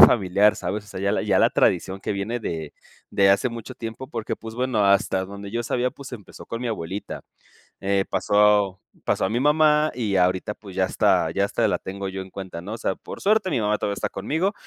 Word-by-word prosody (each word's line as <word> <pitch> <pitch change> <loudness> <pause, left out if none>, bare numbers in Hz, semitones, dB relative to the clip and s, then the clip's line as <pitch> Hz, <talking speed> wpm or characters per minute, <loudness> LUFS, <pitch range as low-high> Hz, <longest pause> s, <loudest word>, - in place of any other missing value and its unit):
familiar, 100 -1 +6
¿sabes?, 105 +2 -3
o - - -20
sea, 95 - -7
ya 100 +1 +1
la - - 0
ya - - +2
la - - +5
tradición 95 +2 +1
que - - -2
viene 105 +5 -3
de 80 -7 -4 0.4
de 100 -1 +4
hace 100 +6 +3
mucho 115 +1 -8
tiempo 115 +3 -6
porque, 115 -5 -4
pues, 110 0 -9
bueno, 125 -4 +1
hasta 100 -1 +3
donde 100 +1 -8
yo 120 +2 -2
sabía, 125 +2 0
pues, 135 0 -11
empezó 105 -6 -10
con 115 - -5
mi 125 - -2
abuelita, 100 -2 -5 0.6
eh, 100 0 +1
pasó 105 -2 +3 0.2
pasó - - +1
a - - +2
mi 120 - +1
mamá 150 +2 +4
y 110 -5 -1
ahorita, 90 +3 +1
pues, 100 -4 -12
ya 95 - +2
hasta 95 - +2
ya 100 - +1
hasta 100 - +1
la - - +1
tengo 95 +1 -5
yo 95 0 -4
en 95 - -12
cuenta, 95 -3 -7
¿no?, 100 +5 -7
o - - -7
sea, 95 - -1
por - - -9
suerte, 210 -1 +2
mi 130 -8 +1
mamá 105 0 +1
todavía 100 - -1
está - - -2
conmigo, 160 - -1
105 Hz, 230 wpm, -24 LUFS, 95-120 Hz, 0.6 s, familiar